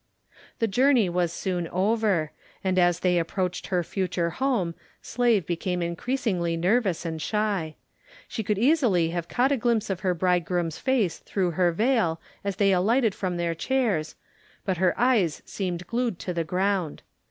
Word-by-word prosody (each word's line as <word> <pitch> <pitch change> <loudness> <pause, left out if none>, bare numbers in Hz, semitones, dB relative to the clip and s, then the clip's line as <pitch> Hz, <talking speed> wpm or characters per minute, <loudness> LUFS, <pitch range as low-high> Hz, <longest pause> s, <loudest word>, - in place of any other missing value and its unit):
The 225 - +1
journey 245 -1 +3
was 175 -1 0
soon 175 -1 -2
over, 195 -3 +1 0.3
and 185 -1 +1
as 175 -1 +3
they 180 -1 +3
approached 180 +2 -2
her 180 -2 0
future 180 -2 -2
home 215 -6 0 0.3
Slave 235 -7 +1
became 175 +1 -2
increasingly 175 -2 -1
nervous 185 -1 +1
and 160 -1 -4
shy. 200 -6 -1 0.5
She - - -4
could 210 -1 -1
easily 230 - +3
have 170 -1 -3
caught 255 +3 +2
a 280 - +2
glimpse 225 -3 0
of 185 - -2
her 185 -2 0
bridegroom's 175 -1 0
face 250 -10 +1
through 185 -3 -1
her 175 +1 +2
veil 210 -4 +1 0.2
as 200 -1 -2
they 195 0 +3
alighted 220 +5 +2
from 185 -3 -3
their 170 -1 0
chairs, 200 - -1 0.5
but 190 -3 0
her 185 +1 +1
eyes 225 - +2
seemed 180 -3 -4
glued 235 -4 -1
to 180 - -4
the 170 -1 -1
ground. 185 -1 -1
185 Hz, 160 wpm, -26 LUFS, 170-220 Hz, 0.5 s, journey